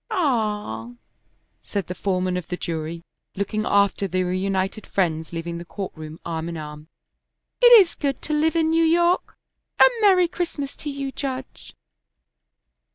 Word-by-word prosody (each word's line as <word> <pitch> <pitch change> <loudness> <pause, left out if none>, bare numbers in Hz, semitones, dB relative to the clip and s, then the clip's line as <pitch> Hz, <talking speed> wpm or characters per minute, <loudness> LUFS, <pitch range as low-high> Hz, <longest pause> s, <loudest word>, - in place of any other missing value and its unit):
"Ah!" 210 - -1 0.7
said 200 -2 -3
the 180 - -5
foreman 185 -1 -1
of 180 -2 -4
the 180 - -4
jury, 165 0 -4 0.3
looking 215 +2 -2
after 200 0 +2
the 185 0 0
reunited 190 +3 -2
friends 160 -4 -1
leaving 170 0 -4
the - - -7
court 190 +3 -6
room 155 0 -9
arm 165 0 -3
in 170 - -5
arm; 150 0 -8 0.7
"it 485 -1 +8
is 370 -4 +3
good 280 -2 -2
to 305 - -2
live 315 +2 +2
in 320 -1 +2
New 330 0 +3
York. 345 +2 +2 0.4
A - - +9
merry 375 -4 +5
Christmas 330 -5 -4
to 300 - -5
you, 275 -1 -4
Judge!" 265 -1 -6
195 Hz, 155 wpm, -23 LUFS, -, 0.7 s, A